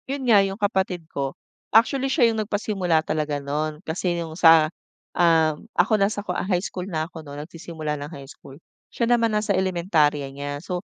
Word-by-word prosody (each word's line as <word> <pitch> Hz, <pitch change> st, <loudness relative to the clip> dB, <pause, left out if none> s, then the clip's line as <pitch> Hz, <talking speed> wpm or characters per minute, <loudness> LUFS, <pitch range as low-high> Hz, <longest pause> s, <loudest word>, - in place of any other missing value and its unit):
Yun 275 Hz, 0 st, -3 dB
nga 225 Hz, -4 st, +6 dB
yung 195 Hz, 0 st, -2 dB
kapatid 190 Hz, -5 st, -1 dB
ko. 135 Hz, -1 st, -3 dB, 0.3 s
Actually, 265 Hz, +5 st, +3 dB
siya 245 Hz, -4 st, +4 dB
yung 220 Hz, -, -1 dB
nagpasimula 195 Hz, -6 st, 0 dB
talaga 150 Hz, -1 st, -1 dB
no'n 150 Hz, +2 st, -3 dB
kasi 175 Hz, +2 st, -1 dB
yung 165 Hz, -2 st, -5 dB
sa, 160 Hz, -2 st, +6 dB, 0.5 s
um, 160 Hz, -3 st, +3 dB
ako -, -, +3 dB
nasa 205 Hz, +1 st, +1 dB
ko 180 Hz, -, -2 dB
high 180 Hz, -1 st, 0 dB
school 185 Hz, -3 st, -5 dB
na 155 Hz, -3 st, -2 dB
ako 165 Hz, -2 st, -10 dB
no'n 145 Hz, -1 st, -9 dB
nagsisimula 160 Hz, -2 st, -5 dB
ng 145 Hz, -, -6 dB
high 140 Hz, -4 st, -9 dB
school, 135 Hz, 0 st, -14 dB, 0.3 s
siya 235 Hz, -, -1 dB
naman 230 Hz, -2 st, +3 dB
nasa 210 Hz, -1 st, 0 dB
elementarya 170 Hz, -6 st, +1 dB
niya. 145 Hz, 0 st, -4 dB
So 180 Hz, +2 st, -4 dB
175 Hz, 180 wpm, -23 LUFS, 155-205 Hz, 0.5 s, nga